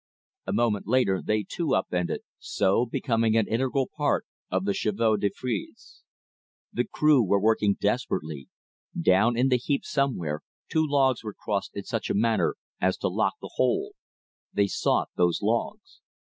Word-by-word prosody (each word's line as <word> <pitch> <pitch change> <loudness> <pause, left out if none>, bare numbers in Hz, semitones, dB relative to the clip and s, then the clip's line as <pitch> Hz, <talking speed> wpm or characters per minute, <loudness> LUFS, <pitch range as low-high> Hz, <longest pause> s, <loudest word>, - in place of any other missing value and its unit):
A - - -1
moment 110 -5 +1
later 110 -6 +2
they 105 -1 0
too 160 -6 -1
up 95 - -1
ended, 90 -1 -1 0.2
so 100 +5 +1
becoming 115 -2 +1
an 110 - +2
integral 130 +3 0
part - - +1 0.2
of 95 +1 -1
the 100 - +1
"chevaux 110 +2 +1
de 100 0 +1
frise." 120 -4 -6 0.7
The 120 - 0
crew 150 -3 +4
were 100 0 +2
working 105 -1 +2
desperately. 75 -3 -2 0.5
Down 100 +8 +3
in 130 +2 +3
the 125 - +4
heap 140 +3 -1
somewhere, 90 - -1 0.3
two 155 -1 +1
logs 135 -4 +2
were 105 -2 -6
crossed 100 -2 -3
in 100 - -4
such 115 0 -3
a - - 0
manner 110 +1 +2 0.2
as - - +1
to - - -1
lock - - 0
the - - -8
whole. - - +1 0.6
They 100 - +2
sought 100 - 0
those 90 -1 +2
logs. - - -2
110 Hz, 165 wpm, -26 LUFS, 100-125 Hz, 0.7 s, crew